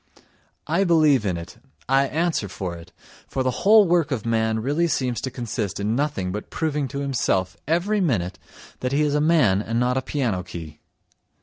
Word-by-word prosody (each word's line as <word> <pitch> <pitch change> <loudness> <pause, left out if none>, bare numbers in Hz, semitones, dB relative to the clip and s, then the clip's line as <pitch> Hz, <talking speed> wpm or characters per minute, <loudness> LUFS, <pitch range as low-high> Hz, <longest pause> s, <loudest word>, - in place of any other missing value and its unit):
I 170 +5 +1
believe 155 - +4
in 90 -3 -1
it, 85 +7 -9 0.3
I 135 +1 +3
answer 160 - -1
for 90 -1 -5
it, 85 +1 -12 0.4
for 130 - -2
the 130 - +1
whole 210 0 +6
work 170 -3 +2
of 125 -7 -3
man 110 -1 +1
really 145 +9 +1
seems 125 -7 -1
to 130 - -3
consist 115 -5 -4
in 105 +3 0
nothing 135 -10 -1
but 105 +2 -6
proving 150 -3 -1
to 140 +1 -5
himself 105 -9 0
every 185 +6 +1
minute 100 - -1 0.4
that 125 +1 -2
he 150 +2 +3
is 145 -1 +1
a 150 - +2
man 145 - +3
and 115 +2 -2
not 125 +1 +1
a - - +1
piano 120 -11 -1
key! 80 -4 -9
130 Hz, 190 wpm, -23 LUFS, 105-150 Hz, 0.4 s, whole